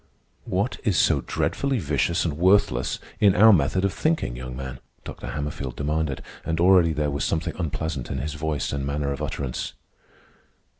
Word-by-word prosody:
"What 105 +2 -1
is 105 -8 +1
so 75 -5 +3
dreadfully 140 -2 0
vicious 80 - 0
and 80 -4 -1
worthless 90 -8 +3 0.2
in 100 -3 +5
our 110 +3 +8
method 95 +4 +2
of 100 - 0
thinking, 155 - 0
young 65 0 -7
man?" 65 -1 -6 0.2
Dr. - - -8
Hammerfield 70 -3 -4
demanded, 75 -1 -1 0.2
and 80 0 -2
already 90 -2 +5
there 75 -2 -1
was 70 - -2
something 80 0 -1
unpleasant 80 -5 -3
in 65 - -3
his 70 +3 -3
voice 75 -1 -2
and 70 -1 -2
manner 70 0 -1
of 70 - -4
utterance. 65 -3 -3
75 Hz, 165 wpm, -25 LUFS, 70-90 Hz, 0.2 s, our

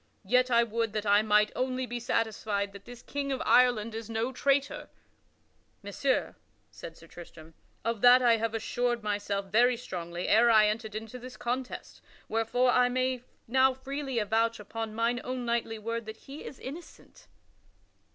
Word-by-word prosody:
Yet 250 0 +3
I 235 -1 +4
would 230 -1 -2
that 215 -1 -2
I 205 0 +5
might 210 0 +3
only 255 0 -1
be 240 0 -5
satisfied 215 -3 -1
that 200 0 -12
this 245 0 -11
King 280 -1 -3
of 265 - -1
Ireland 240 -3 +4
is 225 0 -6
no 225 +3 -1
traitor." 280 +2 0 0.9
"Messire," 255 +7 -1 0.4
said 165 - -10
Sir 165 - -15
Tristram, 165 -1 -13 0.3
"of 230 -2 -1
that 245 +1 +8
I 240 -2 +4
have 225 0 -2
assured 240 +1 -1
myself 205 -2 -2
very 240 +3 +4
strongly 175 -6 -5
ere 235 +3 +5
I 215 -2 +6
entered 215 0 -2
into 225 +3 -6
this 250 +1 -10
contest, 250 +1 -5 0.3
wherefore 225 +3 +1
I 250 0 +4
may 255 0 0 0.3
now 260 +2 +3
freely 270 0 -5
avouch 225 +1 +1
upon 220 +1 -6
mine 235 +2 0
own 255 -1 -4
knightly 235 -1 -1
word 230 +1 -4
that 220 0 -7
he 280 +5 -11
is 265 - -8
innocent." 310 +7 -11
230 Hz, 165 wpm, -29 LUFS, 215-250 Hz, 0.9 s, that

